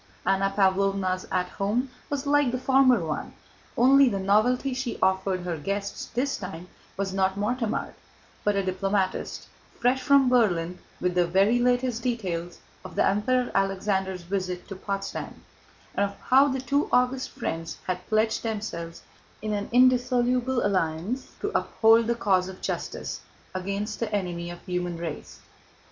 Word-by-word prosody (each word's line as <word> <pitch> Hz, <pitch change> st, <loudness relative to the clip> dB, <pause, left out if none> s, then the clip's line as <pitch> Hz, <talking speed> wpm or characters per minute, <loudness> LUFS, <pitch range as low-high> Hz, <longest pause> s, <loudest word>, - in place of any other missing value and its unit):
Anna 195 Hz, 0 st, +2 dB
Pávlovna's 195 Hz, -1 st, +1 dB
"At 180 Hz, -1 st, +1 dB
Home" 235 Hz, +7 st, 0 dB, 0.2 s
was 285 Hz, -1 st, -2 dB
like 285 Hz, -2 st, +3 dB
the 255 Hz, -, -1 dB
former 255 Hz, -6 st, +4 dB
one, 155 Hz, -1 st, -4 dB, 0.4 s
only 270 Hz, +2 st, +6 dB
the 200 Hz, -, -2 dB
novelty 220 Hz, +7 st, +2 dB
she 255 Hz, -1 st, -3 dB
offered 190 Hz, 0 st, +1 dB
her 175 Hz, -2 st, -3 dB
guests 200 Hz, +5 st, -3 dB
this 265 Hz, +4 st, -1 dB
time 180 Hz, -2 st, -8 dB, 0.3 s
was 195 Hz, -1 st, -2 dB
not 190 Hz, 0 st, +1 dB
Mortemart, 225 Hz, +2 st, -1 dB, 0.5 s
but 205 Hz, -1 st, +2 dB
a 200 Hz, -, +1 dB
diplomatist 190 Hz, 0 st, -1 dB, 0.3 s
fresh 250 Hz, +2 st, +2 dB
from 280 Hz, 0 st, +5 dB
Berlin 180 Hz, -8 st, +2 dB, 0.2 s
with 180 Hz, 0 st, 0 dB
the 175 Hz, -1 st, +2 dB
very 195 Hz, +7 st, +3 dB
latest 245 Hz, -1 st, +1 dB
details 180 Hz, -9 st, -3 dB, 0.3 s
of 185 Hz, -2 st, -10 dB
the -, -, +3 dB
Emperor 245 Hz, +5 st, +1 dB
Alexander's 190 Hz, -1 st, 0 dB
visit 180 Hz, -1 st, -3 dB
to 195 Hz, -, -5 dB
Potsdam, 195 Hz, +1 st, -5 dB, 0.5 s
and 200 Hz, 0 st, +1 dB
of 200 Hz, -, -15 dB
how 270 Hz, +2 st, +5 dB
the 265 Hz, -2 st, -1 dB
two 280 Hz, +3 st, 0 dB
august 250 Hz, +1 st, +2 dB
friends 165 Hz, 0 st, -4 dB
had 180 Hz, 0 st, -2 dB
pledged 220 Hz, 0 st, +1 dB
themselves 205 Hz, -7 st, -5 dB, 0.4 s
in 215 Hz, 0 st, -3 dB
an 205 Hz, 0 st, -3 dB
indissoluble 250 Hz, 0 st, +3 dB
alliance 185 Hz, +5 st, -1 dB
to -, -, -1 dB
uphold 225 Hz, 0 st, +4 dB
the 235 Hz, -, +1 dB
cause 190 Hz, -5 st, +2 dB
of 190 Hz, -, -10 dB
justice -, -, -4 dB, 0.3 s
against 200 Hz, +3 st, -3 dB
the 230 Hz, -2 st, -2 dB
enemy 175 Hz, -4 st, -2 dB
of 175 Hz, 0 st, -10 dB
the 185 Hz, -, -9 dB
human 175 Hz, -1 st, -2 dB
race. 165 Hz, -2 st, -7 dB
200 Hz, 155 wpm, -26 LUFS, 185-245 Hz, 0.5 s, only